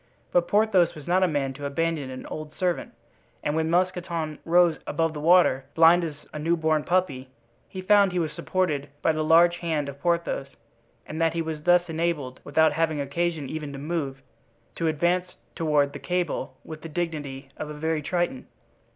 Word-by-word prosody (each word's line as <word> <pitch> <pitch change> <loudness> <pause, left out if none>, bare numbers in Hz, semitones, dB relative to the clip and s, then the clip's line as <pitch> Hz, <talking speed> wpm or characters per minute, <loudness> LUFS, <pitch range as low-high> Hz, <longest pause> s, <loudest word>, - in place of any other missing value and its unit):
But 175 -1 +2
Porthos 195 -5 +3
was 150 -2 -10
not 180 +2 +2
a 185 - +4
man 140 -4 -1
to 145 +2 -7
abandon 155 -1 -1
an 130 0 -8
old 155 0 -7
servant, 180 -2 -1 0.5
and 150 - -1
when 160 0 0
Mousqueton 170 -3 -1
rose 170 -1 +4
above 165 -1 0
the 150 - -6
water, 155 -5 +4
blind 165 +2 +6
as 150 -3 -6
a 150 - -5
new 165 +3 +1
born 155 -1 +1
puppy, 145 -8 0 0.4
he 185 -1 -7
found 200 0 +5
he 180 - -3
was 160 -3 0
supported 155 -7 -1
by - - +4
the 155 0 -1
large 170 +2 +5
hand 160 -4 -2
of 140 0 -8
Porthos 170 -5 0 0.6
and 155 +2 -5
that 165 -1 +2
he 165 - -1
was 160 -2 -5
thus 175 0 +4
enabled, 160 -6 -2
without 160 -1 +3
having 160 -1 0
occasion 155 +1 -2
even 150 0 -5
to - - -6
move, 140 -3 -4 0.5
to 165 - -2
advance 180 +4 0 0.2
toward 150 -4 +1
the - - -7
cable 175 -7 -2
with 155 -1 -8
the 165 - -8
dignity 150 -5 -4
of 150 - -5
a 150 - -6
very 160 +1 -1
triton. 175 -4 -2
160 Hz, 185 wpm, -26 LUFS, 150-175 Hz, 0.6 s, blind